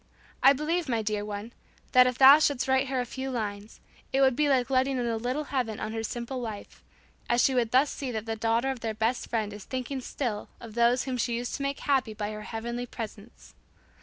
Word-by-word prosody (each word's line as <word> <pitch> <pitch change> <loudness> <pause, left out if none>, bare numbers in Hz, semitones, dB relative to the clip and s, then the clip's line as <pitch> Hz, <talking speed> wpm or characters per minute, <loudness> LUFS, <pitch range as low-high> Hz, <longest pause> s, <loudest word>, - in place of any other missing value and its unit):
I 270 - +8
believe, 310 +3 -1
my 230 -3 0
dear 210 -1 -1
one, 210 +3 -6 0.4
that 255 0 +7
if 250 -1 -1
thou 275 +3 +9
shouldst 285 -4 +1
write 265 +1 +2
her 260 -1 -1
a 250 - -1
few 265 +2 -5
lines, 210 -4 -5 0.3
it 270 - +2
would 265 -2 +4
be 295 +1 +2
like 255 -2 +2
letting 265 +1 +2
in 245 - -1
a 230 -1 0
little 250 +6 -2
heaven 235 -5 -1
on 215 - -4
her 225 - -2
simple 240 +3 -4
life, 220 -4 -7 0.5
as 240 0 +3
she 270 - +3
would 240 -3 +1
thus 265 +5 +3
see 270 - -5
that 220 -3 -4
the 225 -1 -2
daughter 230 +4 +1
of 260 - -6
their 225 -1 -3
best 225 +3 -1
friend 215 -3 -1
is 205 -1 -9
thinking 260 +1 -4
still 240 -5 -4
of 225 -2 -10
those 235 +2 +3
whom 260 -2 -3
she 235 0 0
used 245 +1 -4
to - - -8
make 275 0 -2
happy 260 -6 +1
by 210 0 -3
her 215 0 -6
heavenly 235 +3 -5
presence. 220 -1 -9
240 Hz, 230 wpm, -28 LUFS, 225-265 Hz, 0.5 s, thou